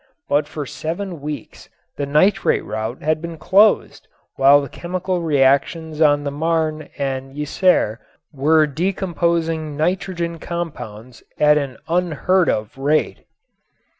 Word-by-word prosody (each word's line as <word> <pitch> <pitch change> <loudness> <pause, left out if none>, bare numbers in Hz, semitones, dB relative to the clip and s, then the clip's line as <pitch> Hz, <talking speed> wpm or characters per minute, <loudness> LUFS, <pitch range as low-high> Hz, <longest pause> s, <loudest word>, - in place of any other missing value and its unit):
But 145 +1 +1
for 150 -1 -5
seven 170 +5 -5
weeks 150 0 -7 0.3
the 140 - -3
nitrate 155 +8 +2
route 110 +3 -4
had 155 +1 0
been 170 -1 -6
closed 200 +6 +3 0.3
while 140 +1 +6
the 140 - -4
chemical 180 +4 -3
reactions 155 +2 +1
on 145 -2 +4
the 140 - -3
Marne 155 0 -1
and 135 -1 -3
Yser 150 - +1 0.3
were 155 +3 +3
decomposing 165 -2 -1
nitrogen 170 0 -2
compounds 130 -10 -6 0.2
at 150 0 +5
an 135 -4 -5
unheard 180 +1 +1
of 105 +5 -2
rate. 150 +3 0
155 Hz, 120 wpm, -20 LUFS, 140-170 Hz, 0.3 s, while